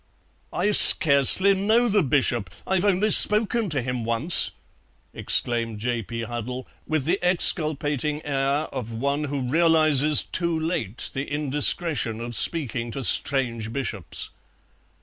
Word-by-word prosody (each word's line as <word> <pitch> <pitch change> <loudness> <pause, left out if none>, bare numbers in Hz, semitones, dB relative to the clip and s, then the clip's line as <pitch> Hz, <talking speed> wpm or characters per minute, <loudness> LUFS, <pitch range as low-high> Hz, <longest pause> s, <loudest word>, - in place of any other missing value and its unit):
"I 210 - -3
scarcely 160 +2 +7
know 220 +5 -1
the 205 -2 0
Bishop; 130 - -2 0.2
I've 190 -1 -3
only 205 +2 -1
spoken 215 +1 +3
to 145 -5 -4
him 125 -1 -6
once," 115 +9 +4 0.6
exclaimed 115 -2 -2
J. 120 +2 -5
P. 115 +2 -8
Huddle, 120 +2 -8 0.2
with 155 -4 -4
the 180 +5 -2
exculpating 150 -4 0
air 140 +1 -3
of 115 -4 -8
one 140 +5 -4
who 140 -1 -6
realizes 155 0 +1
too 170 -2 -4
late 145 - -5
the 135 +2 -7
indiscretion 145 -3 -2
of 120 0 -8
speaking 120 -7 -2
to 135 +3 -8
strange 115 -4 -2
Bishops. 115 -8 -7
140 Hz, 130 wpm, -21 LUFS, 120-165 Hz, 0.6 s, scarcely